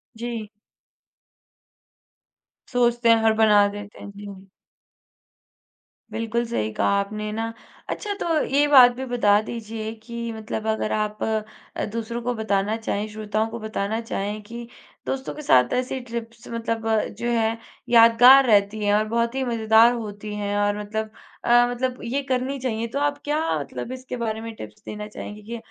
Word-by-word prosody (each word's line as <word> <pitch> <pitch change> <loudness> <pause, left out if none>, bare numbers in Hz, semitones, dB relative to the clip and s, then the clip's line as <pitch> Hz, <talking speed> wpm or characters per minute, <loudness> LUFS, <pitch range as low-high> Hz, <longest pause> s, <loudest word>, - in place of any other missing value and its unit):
जी। 230 -2 -5 2.2
सोचते 240 -1 +2
हैं, 230 - +7
हड़बड़ा 215 -2 +5
देते 205 0 -8
हैं। 205 - -9
जी। 200 -1 -10 1.6
बिल्कुल 230 +1 -1
सही 110 - -2
कहा - - +1
आपने 210 +1 -4
ना। 225 +1 -3 0.4
अच्छा, 415 -2 -3
तो 325 -3 +1
ये 285 +2 +2
बात 255 -4 +8
भी 265 - -5
बता 220 -5 +3
दीजिए 220 -1 -6
कि 235 -1 -5
मतलब 220 0 -5
अगर 220 0 0
आप 210 0 -2
अ, 215 -1 -4
दूसरों 230 +1 -4
को 245 +1 -1
बताना 210 -1 0
चाहें, 215 -2 -2
श्रोताओं 215 +1 -2
को 235 +1 -6
बताना 215 0 -2
चाहें, 210 -1 -4
कि 235 +2 -8 0.4
दोस्तों 265 0 -3
के 300 - -7
साथ 125 - +4
ऐसी 255 +1 -1
ट्रिप्स 235 -1 -7
मतलब 230 -1 -3 0.3
जो 240 0 -1
है 225 +1 0 0.3
यादगार 245 +3 +8
रहती 210 -1 +3
हैं 205 - +3
और 210 +1 +3
बहुत 235 +2 0
ही 265 - 0
मज़ेदार 225 0 +5
होती 210 -2 -6
हैं 205 0 -2
और 205 0 +1
मतलब 215 +1 -4 0.3
अ, 240 0 +5
मतलब 250 +1 -2
ये 275 +4 -2
करनी 260 +2 -1
चाहिए। 230 -2 -2
तो 280 - 0
आप 290 0 0
क्या 300 +1 0 0.2
मतलब 240 - -6
इसके 255 0 -6
बारे 220 0 -2
में 230 0 -6
टिप्स 105 - -11
देना 210 0 -6
चाहेंगी 210 0 -9
कि 235 - -3
225 Hz, 160 wpm, -24 LUFS, 210-240 Hz, 2.2 s, बात